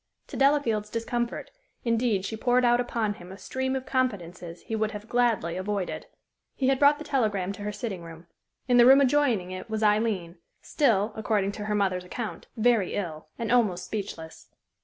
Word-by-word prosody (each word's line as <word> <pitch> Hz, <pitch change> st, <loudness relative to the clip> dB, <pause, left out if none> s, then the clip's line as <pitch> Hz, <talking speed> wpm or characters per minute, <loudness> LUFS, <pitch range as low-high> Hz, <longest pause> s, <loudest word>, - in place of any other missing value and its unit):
To -, -, -7 dB
Delafield's 255 Hz, -6 st, +2 dB
discomfort, 235 Hz, +1 st, -3 dB, 0.3 s
indeed, 230 Hz, -4 st, +1 dB
she 220 Hz, -, -3 dB
poured 245 Hz, +2 st, +2 dB
out 240 Hz, 0 st, +4 dB
upon 230 Hz, -3 st, -1 dB
him 180 Hz, -2 st, -12 dB
a 190 Hz, -, -9 dB
stream 260 Hz, +4 st, -3 dB
of 260 Hz, -1 st, -3 dB
confidences 180 Hz, -10 st, -3 dB
he 225 Hz, -, -4 dB
would 215 Hz, -1 st, 0 dB
have 210 Hz, +1 st, -8 dB
gladly 230 Hz, -9 st, +1 dB
avoided. 195 Hz, 0 st, -3 dB, 0.5 s
He 265 Hz, -1 st, +1 dB
had 270 Hz, -1 st, +2 dB
brought 290 Hz, +1 st, +6 dB
the 305 Hz, -, -7 dB
telegram 210 Hz, -10 st, 0 dB
to 200 Hz, -, -10 dB
her 210 Hz, +1 st, -3 dB
sitting 205 Hz, -4 st, -5 dB
room. 165 Hz, 0 st, -11 dB, 0.4 s
In 245 Hz, -1 st, +4 dB
the 240 Hz, 0 st, +8 dB
room 270 Hz, +1 st, +8 dB
adjoining 255 Hz, -9 st, +2 dB
it 185 Hz, +3 st, -7 dB
was 220 Hz, 0 st, -2 dB
Aileen, 210 Hz, -5 st, +1 dB, 0.2 s
still, 225 Hz, -8 st, +1 dB
according 210 Hz, -2 st, 0 dB
to 205 Hz, 0 st, -6 dB
her 210 Hz, 0 st, -1 dB
mother's 190 Hz, -3 st, 0 dB
account, 180 Hz, -1 st, -6 dB
very 225 Hz, -4 st, +2 dB
ill, 160 Hz, -6 st, -4 dB
and 230 Hz, -1 st, -3 dB
almost 200 Hz, -8 st, +2 dB
speechless. 190 Hz, -6 st, -7 dB
215 Hz, 180 wpm, -27 LUFS, 190-245 Hz, 0.5 s, the